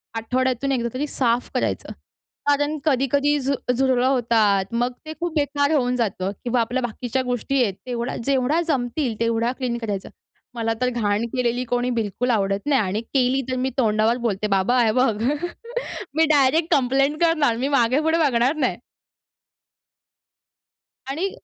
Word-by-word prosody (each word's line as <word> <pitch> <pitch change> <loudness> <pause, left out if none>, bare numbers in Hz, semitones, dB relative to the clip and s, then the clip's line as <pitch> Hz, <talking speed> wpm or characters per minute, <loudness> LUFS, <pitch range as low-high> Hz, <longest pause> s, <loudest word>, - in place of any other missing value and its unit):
आठवड्यातून 255 +3 0
एकदा 235 -3 0
तरी 275 +4 -2
साफ 245 -3 0
करायचं. - - -2 0.6
कारण 290 +1 +2
कधी-कधी 285 +1 +2
झु 275 +1 0 0.2
झुरळ 255 -1 +2
होतात, 225 -7 +2
मग 240 +2 +1
ते 310 - -6
खूप 345 -1 -2
बेकार 285 0 +1
होऊन 250 -4 +2
जातं 195 -5 -1
किंवा 245 0 +1
आपल्या 245 +3 -1
बाकीच्या 245 +2 -2
गोष्टी 250 +2 -1
आहेत 205 -5 0
तेवढा 240 0 -3
जेवढा 275 +4 +2
जमतील 245 -4 -1
तेवढा 230 +1 +1
क्लीन 250 -3 -2
करायचं. 210 -5 -4 0.5
मला 225 -1 0
तर 250 - +2
घाण 220 -2 0
केलेली 250 -1 0
कोणी 245 +1 0
बिलकुल 230 +1 -1
आवडत 195 -1 0
नाही 275 -5 +3
आणि 200 +2 -2
केली 255 +2 +1
तर - - 0
मी 255 +1 0
तोंडावर 220 -1 +2
बोलते 210 0 -1
बाबा, 195 +5 +2
हे 220 - +3
बघ 225 -3 +1 0.9
मी 320 - +4
डायरेक्ट 290 +3 +3
कम्प्लेंट 275 +3 +1
करणार, 310 -8 +3
मी 260 +3 -1
मागे-पुढे 285 +4 +2
बघणार 250 +2 +2
नाही. 305 - 0 2.3
आणि 335 +8 -1
250 Hz, 150 wpm, -22 LUFS, 230-275 Hz, 2.3 s, मी